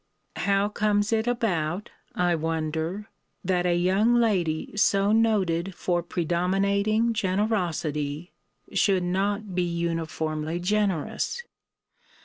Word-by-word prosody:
How 200 0 +2
comes 210 0 +1
it 220 +1 +1
about, 190 -7 -1 0.2
I 180 -1 +2
wonder, 160 +4 -2 0.4
that 180 -1 +1
a 175 - +2
young 190 +7 +3
lady 185 -10 +1
so 200 0 +3
noted 195 -5 +1
for 175 -1 0
predominating 195 +7 +1
generosity, 175 -7 -1 0.4
should 195 -2 +3
not 200 +3 -1
be 180 - +1
uniformly 165 -2 -2
generous? 205 - -1
185 Hz, 100 wpm, -26 LUFS, 170-210 Hz, 0.4 s, young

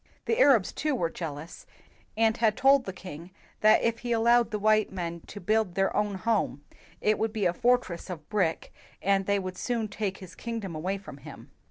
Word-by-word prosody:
The 455 - 0
Arabs, 255 - +5
too, 300 -2 -1
were 170 -8 -1
jealous 160 0 -7 0.5
and 225 0 +3
had 220 -2 +2
told 270 -1 +5
the 190 - -4
king 180 -2 -10 0.3
that 215 0 +5
if 230 0 0
he 245 - -4
allowed 235 +1 +4
the 215 - -2
white 215 0 +2
men 170 -2 -4
to 205 - -8
build 215 -1 0
their 195 0 +1
own 210 -1 0
home, 195 -8 -1 0.4
it 215 0 +2
would 220 0 0
be 215 -3 -1
a 175 - +2
fortress 240 -6 0
of 160 -4 -7
brick, 185 -6 -1 0.3
and 195 0 +1
they 200 0 +2
would 185 -1 -5
soon 235 -3 -1
take 200 -1 -3
his 185 -2 -11
king 230 -1 -5
dom 195 -5 -6
away 180 +6 -2
from 190 -8 -11
him. - - -12
205 Hz, 205 wpm, -28 LUFS, 180-225 Hz, 0.5 s, Arabs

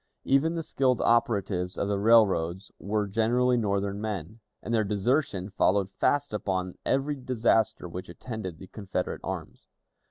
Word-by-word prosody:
Even 150 +5 +2
the 165 - -2
skilled 130 -4 +1
operatives 100 -6 +1
of - - -1
the 100 -1 0
railroads 100 -4 +3
were 105 +1 -1
generally 120 +5 +2
Northern 100 -2 -1
men, 105 -1 -5 0.2
and 115 - -3
their 110 -1 +3
desertion 105 -1 0
followed 95 0 +2
fast 145 +4 +1
upon 95 -3 -2
every 135 +2 +1
disaster 120 -7 +1
which 90 +1 -7
attended 95 -2 -6
the 95 - -10
Confederate 100 +1 -4
arms. - - -6
105 Hz, 140 wpm, -28 LUFS, 95-120 Hz, 0.2 s, railroads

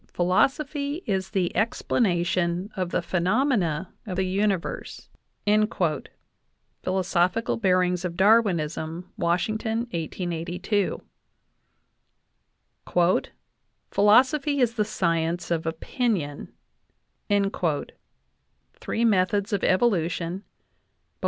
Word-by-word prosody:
"Phil 175 - +1
" - - -1
osophy 285 - +1
is 190 -4 -1
the 185 -3 -1
explanation 185 -4 0
of 185 -3 -2
the 175 - -1
phenomena 185 - 0
of 185 - -3
the 190 +1 0
universe" 195 -1 -2 1.7
(Philosophical 185 +3 +1
Bearings 180 -3 +2
of 175 -2 -3
Darwinism, 180 -5 +2
Washington, 215 +6 0
1882); 175 +4 -2 2.9
"Philosophy 265 +8 +4
is 240 -3 +2
the 220 -2 +1
science 170 -3 -1
of 165 -1 -1
opinion" 165 - -2 2.2
(Three 470 - -2
Methods 200 0 +2
of 200 - 0
Evolution, 180 -4 +1
Bull. 205 - -24
185 Hz, 80 wpm, -25 LUFS, 175-220 Hz, 2.9 s, Philosophy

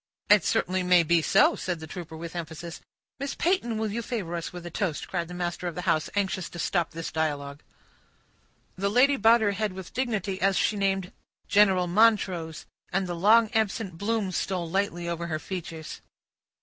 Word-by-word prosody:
"It 205 -4 +7
certainly 185 +1 +1
may 180 -1 +5
be 170 +1 +3
so," - - +4
said 180 -3 -3
the 160 - -7
trooper, 160 -1 -8
with 170 +1 -7
emphasis. 165 0 -6 0.4
"Miss 275 +1 -3
Peyton, 335 - 0
will 220 -1 -1
you 235 +3 -2
favor 205 -8 -4
us 170 - -4
with 175 -1 -9
a 175 - -6
toast?" 170 -4 -2
cried 175 -3 -2
the 180 - -8
master 175 0 -3
of 175 - -4
the 180 - -4
house, 165 -4 +1
anxious 190 -3 -1
to - - -10
stop 175 -1 0
this 165 0 -6
dialogue. 145 -2 -2 1.1
The 200 +2 -1
lady 260 +6 +4
bowed 230 -2 +5
her 205 -2 +2
head 205 0 -2
with 185 -1 -9
dignity, 215 -6 -2
as 195 0 +3
she 215 - +2
named 195 -2 0 0.4
"General 195 -3 +4
Montrose"; 180 -5 +2 0.3
and 190 +1 0
the 175 - -4
long 215 +6 +4
absent 210 -5 -1
bloom 210 -2 -1
stole 180 -1 -2
lightly 175 -1 -1
over 170 0 -3
her 155 -2 -2
features. 165 -2 -7
185 Hz, 190 wpm, -27 LUFS, 170-205 Hz, 1.1 s, It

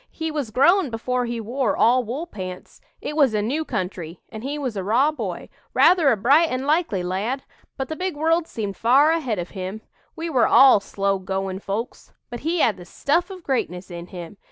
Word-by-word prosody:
He 320 -1 -4
was 290 -6 -3
grown 295 - +4
before 245 +2 -2
he 235 -1 -3
wore 240 +2 -1
all 250 +2 +4
wool 255 +9 -4
pants. 185 - -9 0.2
It 300 - -4
was 275 -8 +3
a 210 - +1
new 285 +9 -1
country, 180 - -5
and 220 0 -8
he 285 +3 -3
was 260 -6 -3
a 195 - -3
raw 245 +10 +3
boy, 215 - -5 0.3
rather 345 -5 +5
a 230 - +2
bright 285 +10 +4
and 255 +1 -2
likely 295 - +1
lad; 205 +9 -2 0.3
but 265 - -3
the 315 - -4
big 365 -1 -3
world 325 +2 +1
seemed 205 -3 -4
far 270 - +4
ahead 275 -10 -1
of 175 0 -5
him. 190 +2 -6 0.3
We 330 +1 -4
were 260 -8 +3
all 265 -5 +7
slow 195 0 -1
goin' 190 0 -3
folks. 205 +4 -5 0.2
But 240 - -5
he 330 +2 0
had 215 - +2
the 175 - -11
stuff 335 - 0
of 375 -2 -9
greatness 190 - -2
in 170 0 -7
him. 175 +1 -9
245 Hz, 205 wpm, -23 LUFS, 195-300 Hz, 0.3 s, all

